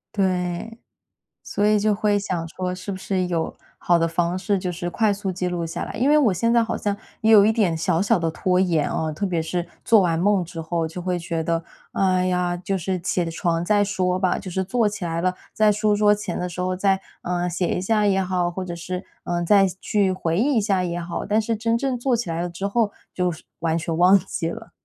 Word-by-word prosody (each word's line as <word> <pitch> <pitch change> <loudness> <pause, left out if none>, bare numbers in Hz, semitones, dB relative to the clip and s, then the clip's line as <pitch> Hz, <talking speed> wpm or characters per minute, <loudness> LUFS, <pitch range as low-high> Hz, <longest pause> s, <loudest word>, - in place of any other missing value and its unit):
对， 185 +3 -1 0.6
所 205 +1 -1
以 210 0 +4
就 210 0 +2
会 205 -1 +1
想 180 -5 -3
说 180 +1 -3
是 185 +2 -6
不 190 - -4
是 185 -1 -1
有 170 -2 -2 0.2
好 175 - +3
的 165 0 +2
方 170 +2 0
式， 200 0 0
就 180 -1 -3
是 175 +1 -4
快 210 +4 +1
速 200 -1 -2
记 180 0 -2
录 175 -2 -2
下 165 - -4
来。 - - -6
因 245 +5 +1
为 - - +6
我 265 -9 +4
现 230 +6 +1
在 235 - +4
好 225 - -2
像 205 -1 -1 0.3
也 220 +1 +4
有 205 -2 +8
一 215 - +4
点 205 -7 +1
小 165 +1 0
小 200 - +3
地 165 -1 0
拖 180 +2 +1
延 165 -5 +2
哦， 160 -1 -2
特 175 +7 -3
别 175 -4 0
是 170 +1 -3 0.2
做 225 -2 +5
完 170 -3 +1
梦 195 -1 +2
之 165 -1 -7
后 165 0 -1
就 170 +3 -7
会 180 0 -1
觉 165 -1 -3
得， 165 0 -1 0.3
哎 185 -1 +2
呀， 180 -1 0
就 190 +2 -2
是 185 +1 -2
起 175 0 -1
床 170 0 -1
再 205 +1 +3
说 185 -2 0
吧， 185 -2 +1
就 185 - -7
是 190 +2 -1
坐 220 +3 +1
起 205 -2 -4
来 165 0 -2
了， 185 0 +1 0.2
在 215 -1 +4
书 210 0 +2
桌 210 0 +4
前 210 -4 -4
的 180 - -2
时 180 0 -5
候 185 0 -1
再， 190 0 +2 0.2
嗯， 175 0 -1
写 175 +1 -1
一 180 - -1
下 210 +1 +2
也 195 -1 +3
好， 180 -1 0
或 185 +2 -4
者 175 -2 -5
是， 180 +2 -5 0.2
嗯， 175 0 -1
再 195 +2 +5 0.2
去 200 -3 +1
回 170 -2 -1
忆 275 +7 +2
一 220 - +3
下 195 -3 +1
也 175 0 -2
好， 170 0 -4
但 210 +2 +2
是 225 +1 -1
真 230 +1 0
正 260 +1 -1
坐 245 0 +1
起 230 -6 -3
来 165 0 -2
了 - - -2
之 175 +3 -4
后 215 0 +1 0.2
就 180 -1 0
是 160 - -10 0.2
完 165 -1 +1
全 165 0 -2
忘 185 +3 +6
记 165 -2 -3
了。 225 +4 -8
185 Hz, 265 characters per minute, -23 LUFS, 175-205 Hz, 0.6 s, 有